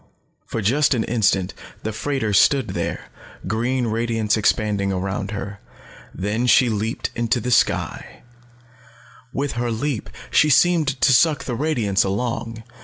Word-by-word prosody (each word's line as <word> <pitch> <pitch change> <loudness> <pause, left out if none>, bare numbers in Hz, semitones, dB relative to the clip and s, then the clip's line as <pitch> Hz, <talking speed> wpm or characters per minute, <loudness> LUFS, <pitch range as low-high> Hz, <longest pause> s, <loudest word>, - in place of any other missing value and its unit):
For 110 - -3
just 135 +6 +3
an 115 - 0
instant 100 -5 +1 0.3
the 110 - -2
freighter 120 -2 -2
stood 130 +3 +4
there, 95 - -4 0.3
green 120 +5 -1
radiance 115 -1 0
expanding 105 -2 +1
around 95 +1 -3
her. 100 -1 -6 0.5
Then 105 +6 -2
she 125 0 +5
leaped 110 +1 -2
into 120 +1 0
the 125 +2 -3
sky. 115 - 0 1.1
With 140 +2 -2
her 120 0 -2
leap, 115 +1 -3 0.2
she 155 - +4
seemed 165 +1 +4
to 135 - +5
suck 155 +3 +3
the 125 - -4
radiance 115 -8 +1
along. 115 +3 -3
115 Hz, 135 wpm, -21 LUFS, 105-125 Hz, 1.1 s, she